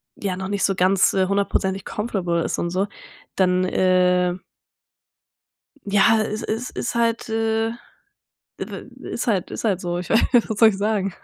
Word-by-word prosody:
ja 190 -3 -3
noch 190 - -4
nicht 200 0 -2
so 195 - +2
ganz, 185 +1 +3
äh, 190 -1 +2
hundertprozentig 195 -1 -1
comfortable 185 -6 -2
ist - - -2
und 170 - -1
so, 190 +3 -1 0.5
dann, 185 -1 +2
äh 180 -1 +2 1.5
ja 205 +2 +4
es 215 0 -4
es 225 +3 -3
ist 240 - -4
halt, 230 -1 0
äh, 225 0 0 0.9
w - - -5 0.5
ist - - -3
halt 200 -6 0
ist - - -6
halt 195 -4 +1
so. 175 -1 -3
Ich 180 - -7
weiß 225 - +5 0.3
was 220 - -3
soll 225 - +8
ich 200 - -1
sagen,? 200 -2 -1
195 Hz, 165 wpm, -22 LUFS, 185-220 Hz, 1.5 s, soll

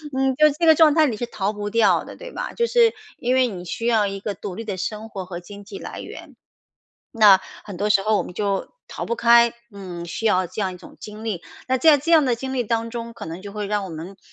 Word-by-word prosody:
嗯， 265 -1 +1
就 305 +1 +6
这 325 +3 0
个 320 - +8
状 310 -2 +6
态， 310 -2 +4
你 220 -4 -3
是 240 - -2
逃 210 -2 -3
不 205 0 -5
掉 230 -1 +3
的， - - -11
对 - - -10
吧？ - - -5
就 470 0 0
是 470 -2 +4 0.2
因 250 +1 0
为 260 -1 +4
你 180 -5 -7
需 230 +7 -3
要 220 -3 +3
一 195 0 -4
个 205 0 -4
独 195 -3 -7
立 225 +4 -6
的 200 -4 -5
生 215 +4 -5
活 190 -3 -6
和 175 -1 -7
经 200 +3 -12
济 200 -1 -9
来 - - -8
源。 - - -11 0.8
那 205 -4 +7 0.2
很 200 -4 -8
多 210 +2 0
时 200 -2 +4
候 215 0 +2
我 180 - 0
们 180 - -10
就 200 - -2 0.2
逃 - - -5
不 235 - -2
开， 235 0 +5 0.2
嗯， 180 -4 -8
需 225 +6 -5
要 185 -4 +3
这 215 - -5
样 190 -2 -1
一 - - -10
种 - - -15
经 215 +1 -9
历。 200 -7 -3 0.3
那 260 - +3
在 310 +1 +6
这 320 +5 -2
样 310 -4 +6
的 245 -2 +1
经 265 +2 -5
历 250 -2 0
当 230 +1 -1
中， 235 0 -6
可 - - -9
能 165 +3 -7
就 200 0 -9
会 210 -1 -3
让 205 -1 -1
我 - - -8
们 170 +5 -8
215 Hz, 290 characters per minute, -22 LUFS, 195-245 Hz, 0.8 s, 个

